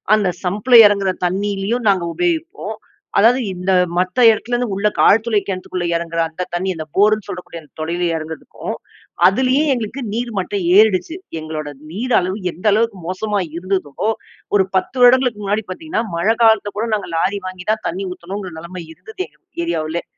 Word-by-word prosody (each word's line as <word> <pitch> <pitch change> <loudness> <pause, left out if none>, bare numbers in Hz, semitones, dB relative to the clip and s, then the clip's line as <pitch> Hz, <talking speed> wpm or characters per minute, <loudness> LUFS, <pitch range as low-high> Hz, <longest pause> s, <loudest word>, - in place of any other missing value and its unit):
அந்த 205 -3 +1 0.2
சம்பில 210 +7 +2
இறங்குகிற 200 -2 +1 0.2
தண்ணியிலேயும் 205 +4 -1
நாங்க 190 -3 +2
உபயோகிப்போம். 340 -2 -2 0.4
அதாவது 240 +5 +5
இந்த 180 +1 -2 0.3
மத்த 180 +3 0
இடத்துலேருந்து 240 0 0
உள்ள 205 +2 +1
க் - - -4
ஆழ்துளை 220 0 +4
கிணத்துக்குள்ள 185 -2 -3
இறங்குகிற 165 0 -1
அந்த 180 +3 -4
தண்ணி 185 +2 -1
அந்த 155 -1 -5
போர்ன்னு 210 +1 +3
சொல்லக்கூடிய 180 -2 -7
அந்த 150 - -22
தொளையில 170 +3 -2
இறங்கறதுக்கும், 160 0 -6 0.5
அதிலேயே 255 +7 +2
எங்களுக்கு 240 +3 -4
நீர் 235 +1 -2
மட்டம் 190 +1 -2
ஏறிடுச்சு. 215 - +3 0.2
எங்களோட 155 -1 -5 0.2
நீர் 240 +7 -2
அளவு 185 +3 -2
எந்த 180 - -14
அளவுக்கு 225 -2 +1
மோசமா 205 +2 -1 0.2
இருந்ததோ, 185 -1 -2 0.5
ஒரு 190 -2 +4
10 190 +7 0
வருடங்களுக்கு 250 -3 +5
முன்னாடி 205 +2 0
பார்த்தீங்கன்னா, 315 - -3
மழை 200 +7 +2
காலத்தில 220 -2 +4
கூட 230 +2 -1
நாங்க 200 - -5
லாரி 200 +5 0
வாங்கி 185 -1 -8
தான் 215 0 -2
தண்ணி 190 +3 -3
ஊத்தணுங்கிற 185 +1 -6
நிலைமை 170 +1 -8
இருந்தது 440 - -15
எங்க - - -30 0.3
ஏரியாவுலே. 165 - -2
200 Hz, 160 wpm, -19 LUFS, 180-225 Hz, 0.5 s, அதாவது